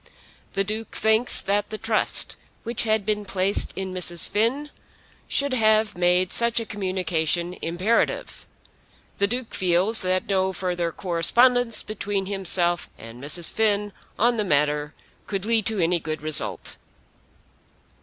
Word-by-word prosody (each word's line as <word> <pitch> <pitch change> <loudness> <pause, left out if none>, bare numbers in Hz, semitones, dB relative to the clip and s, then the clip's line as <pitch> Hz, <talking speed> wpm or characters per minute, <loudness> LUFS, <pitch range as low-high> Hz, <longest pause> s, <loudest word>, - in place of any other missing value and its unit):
The 195 - 0
Duke 215 +2 -5
thinks 220 +3 +2
that 205 +1 -1
the 215 - -5
trust 225 0 +1 0.3
which 235 0 -1
had 215 -2 0
been 210 0 -1
placed 195 0 0
in 190 -1 -5
Mrs. 175 -2 0
Finn 255 +8 -1 0.6
should 280 -1 0
have 215 -3 +2
made 180 +1 +2
such 235 0 +3
a 230 - -5
communication 180 -4 -2
imperative. 185 +8 -1 0.7
The 200 - +3
Duke 245 +2 -4
feels 185 +4 +3
that 185 -1 -1
no 190 -1 0
further 175 -2 -2
correspondence 230 +8 +2
between 205 -2 -3
himself 180 -3 0
and 115 +3 -11
Mrs. 160 +4 +5
Finn 210 -2 0 0.2
on 235 +1 +2
the 210 - 0
matter 150 -3 0 0.3
could 195 -1 -3
lead 225 -2 +1
to 220 -1 -1
any 175 -1 +1
good 155 -1 -6
result. 155 -1 -1
195 Hz, 135 wpm, -23 LUFS, 175-220 Hz, 0.7 s, Mrs